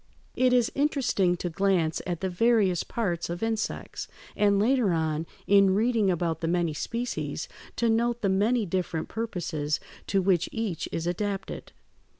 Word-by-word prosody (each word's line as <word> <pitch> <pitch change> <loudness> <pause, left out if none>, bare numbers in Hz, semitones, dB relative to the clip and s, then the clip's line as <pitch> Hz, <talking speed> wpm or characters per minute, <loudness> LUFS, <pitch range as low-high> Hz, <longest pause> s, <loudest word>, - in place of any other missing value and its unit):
It 255 0 +3
is 245 -2 +3
interesting 260 -11 +1
to 175 - -3
glance 175 -3 +1
at 175 -2 -3
the 190 - 0
various 200 -2 +3
parts 175 -9 -2
of 175 +4 -4
insects, 225 -1 -3 0.3
and 205 -1 +3
later 225 -2 +3
on, 160 0 -1 0.2
in 195 -1 +5
reading 220 -1 +2
about 170 -3 -1
the 165 - -1
many 170 -2 +1
species, 240 - -3 0.3
to 235 - +1
note 235 +1 +1
the - - +3
many 210 +4 +2
different 170 -3 -2
purposes 170 -9 -2 0.3
to 195 - +2
which 185 -2 +2
each 220 -8 -3
is 165 - -3
adapted. 195 +2 -3
195 Hz, 155 wpm, -27 LUFS, 175-225 Hz, 0.3 s, in